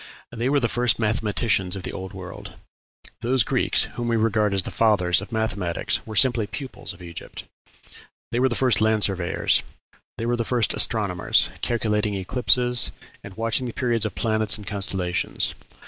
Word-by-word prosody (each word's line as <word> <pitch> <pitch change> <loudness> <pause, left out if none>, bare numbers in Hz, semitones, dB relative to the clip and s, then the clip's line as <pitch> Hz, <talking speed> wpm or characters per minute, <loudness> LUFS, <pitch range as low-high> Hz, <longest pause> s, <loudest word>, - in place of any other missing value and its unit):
They 120 +2 -2
were 145 +1 +3
the 120 - +1
first 120 0 +1
mathematicians 105 -3 +1
of 95 - -7
the - - -4
Old 95 0 -7
World. 95 -2 -9 0.7
Those 120 +1 +3
Greeks - - +1
whom 120 -1 -5
we 115 - +1
regard 110 -2 +2
as 95 -1 0
the - - -5
fathers 95 -6 +2
of - - -9
mathematics 105 -6 -1
were 110 - -6
simply 120 -3 +3
pupils 120 +6 -6
of 90 - -12
Egypt. 85 -1 -8 0.9
They 120 - 0
were 130 +1 +3
the 120 - -2
first 125 -5 +2
land 110 -1 +2
surveyors. 90 -3 +1 0.6
They 115 - -3
were 120 +1 +1
the 115 - 0
first 120 -2 0
astronomers, - - +2
calculating 105 -3 0
eclipses, 125 +4 +3 0.3
and 100 0 -11
watching 115 +3 +1
the 120 - -6
periods 120 -4 +1
of 95 - -9
planets 110 +3 0
and 105 - -11
constellations. 95 -3 -1
110 Hz, 170 wpm, -24 LUFS, 100-120 Hz, 0.9 s, were